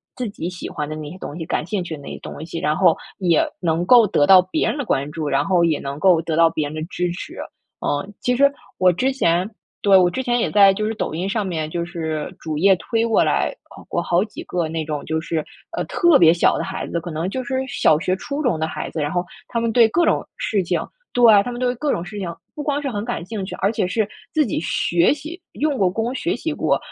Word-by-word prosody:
自 250 -3 -3
己 175 -4 -5
喜 180 -1 -7
欢 150 - -4
的 155 - -4
那 155 -1 -6
些 180 - -10
东 155 -4 -7
西、 165 - -5
感 155 - -2
兴 190 +1 -2
趣 170 -2 -5
的 - - -13
那 140 - -9
些 - - -7
东 155 - -8
西， 165 0 -5
然 150 0 0
后 180 -4 +5 0.2
也 175 -4 +3 0.2
能 170 0 0
够 235 +1 +7
得 145 - +3
到 185 +3 +8
别 185 - -1
人 - - -2
的 285 - -3
关 140 -6 -1
注， 155 -2 -4
然 140 0 +2
后 175 0 +3
也 160 -3 +1
能 140 +1 -5
够 180 -3 +4
得 160 -1 -2
到 165 0 +6
别 155 -2 -2
人 - - -9
的 155 - -4
支 175 +1 -2
持， 175 - -7 0.5
嗯。 190 +8 -2
其 250 - +1
实 280 +2 +5 0.3
我 185 0 +5
之 260 +10 +1
前 180 -7 +1 0.3
对， 195 -1 +6
我 180 -1 +5
之 260 +9 -3
前 245 -1 +1
也 - - 0
在 200 -1 +6
就 215 +2 -2
是 220 - -2
抖 210 - -3
音 175 +4 -2
上 210 0 -1
面， 160 -4 -3
就 170 +2 -2
是 160 -3 -4
主 155 -2 -4
页 190 +4 +5
推 225 +7 -1
过 225 - +3
来， - - +1 0.2
呃， - - -11
过 - - 0
好 175 +2 +2
几 215 - -9
个 175 -2 -1
那 160 0 -3
种 150 -2 -4
就 160 0 -1
是， 160 -1 -2 0.3
呃， - - 0
特 345 -4 +4
别 165 -1 +6
小 170 - +3
的 - - -2
孩 190 - -5
子， 170 - -2
可 170 +1 -7
能 160 +4 -2
就 260 +5 -3
是 260 +1 -3
小 270 - +3
学 185 +2 0
初 280 +10 -4
中 240 - 0
的 160 - 0
孩 - - -5
子， - - -5
然 145 0 -1
后 175 0 0 0.2
他 235 - -2
们 230 0 0
对 230 0 +6
各 345 +10 +2
种 - - +1
事 200 -4 0
情 170 -2 -1 0.3
对， 245 - +1 0.2
他 245 - -4
们 240 - -6
对 250 -1 +1
各 290 +4 -1
种 170 - -2
事 200 +4 -8
情 170 -3 -4 0.2
不 300 - -5
光 290 0 -1
是 280 - -2
很 205 -4 -3
感 240 -8 -3
兴 205 -1 -4
趣， - - -6
而 200 - +2
且 190 - -1
是 215 +3 0 0.3
自 310 -1 +3
己 220 - -2
学 170 - +2
习， 310 +5 -9
用 295 -2 0
过 190 -3 +3
功 225 +6 -2
学 340 +7 -1
习 320 - -3
过。 - - +1
185 Hz, 290 characters per minute, -21 LUFS, 165-230 Hz, 0.5 s, 到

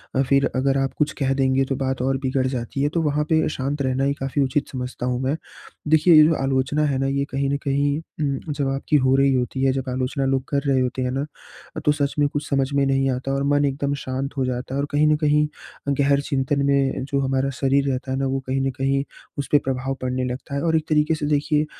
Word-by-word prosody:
अ, 135 - +3
फिर 140 +1 +2
अगर 135 +1 +2
आप 135 0 -1
कुछ 150 0 +1
कह 135 -1 +1
देंगे 135 0 +2
तो 135 - 0
बात 130 -1 -2
और 135 +1 +1
बिगड़ 130 -1 -1
जाती 130 +1 -3
है, 145 - +2
तो 165 +2 -1
वहाँ 150 -1 +1
पे 160 -1 +3
शांत 140 0 -3
रहना 130 0 0
ही 140 +1 +2
काफ़ी 135 0 -2
उचित 135 +2 0
समझता 125 -1 -5
हूँ 125 -1 -1
मैं। 135 +3 0 0.5
देखिए 160 +3 +5
ये 155 - +9
जो 165 - +3
आलोचना 135 +2 +1
है 140 -3 0
ना 135 - 0
ये 140 0 0
कहीं 135 +1 0
न 140 - 0
कहीं 140 +1 +1
उम, 150 -2 -4
जब 140 -1 -1
आपकी 135 +2 -1
हो 130 - +4
रही 135 0 +3
होती 130 +1 -1
है 135 - +4
जब 130 -1 -3
आलोचना 130 +2 -1
लोग 135 -1 +1
कर 140 -1 +1
रहे 135 -1 +3
होते 125 +1 -2
हैं 125 0 -1
ना, 135 +2 -2 0.6
तो 150 - +5
सच 145 -1 -1
में 145 - +4
कुछ 145 +1 -4
समझ 135 -1 +1
में 140 0 +2
नहीं 135 0 +2
आता 130 +2 -3
और 135 0 0
मन 145 0 +2
एकदम 140 0 -1
शांत 130 +2 -3
हो 130 - +1
जाता 125 +1 -3
है - - -1
और 140 - 0
कहीं 150 +1 +3
न 155 - +4
कहीं 150 0 +2 0.5
गहर 140 0 +3
चिंतन 140 0 -1
में 140 -2 +1
जो 140 0 -1
हमारा 135 0 0
शरीर 140 0 +2
रहता 130 0 -3
है 130 - -1
ना 135 - 0
वो 135 +1 -1
कहीं 135 +1 0
न - - -1
कहीं 135 0 +1 0.3
उसपे 145 +1 +2
प्रभाव 135 0 -1
पड़ने 130 0 -1
लगता 130 +2 -5
है 140 - -1
और 165 -1 +2
एक 155 0 -3
तरीके 155 +1 +3
से 150 - -3
देखिए 150 +1 +1
135 Hz, 250 wpm, -22 LUFS, 130-145 Hz, 0.6 s, ये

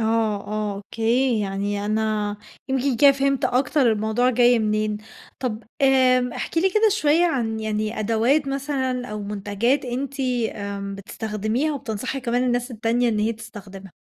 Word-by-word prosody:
آه، 220 -1 +1
آه، 210 -1 -2
أوكي 230 +4 0
يعني 200 +1 -2
أنا 215 -1 0 0.3
يمكن 265 -1 0
كده 280 +1 +7
فهمت 275 -1 0
أكتر 255 -1 +2
الموضوع 220 +4 +1
جاي 245 -1 +4
منين. 215 -1 0 0.4
طَب 230 -4 -3 0.2
آمم 255 -2 +4
احكي 325 - -2
لي 380 +1 +3
كده 435 +2 +4
شوية 335 -3 +3
عن 225 -8 -1
يعني 215 0 -2
أدوات 230 +7 +2
مثلًا 265 -2 -2
أو 210 -3 -5
منتجات 210 +6 -1
أنتِ 270 +3 -4 0.3
آمم، 200 -1 -5
بتستخدميها 215 +7 -2
وبتنصحي 255 +1 -4
كمان 245 0 0
الناس 245 +1 0
التانية 235 +1 +1
إن 215 - 0
هي 220 +2 +1
تستخدمها. 195 -4 -11
230 Hz, 145 wpm, -23 LUFS, 215-260 Hz, 0.4 s, كده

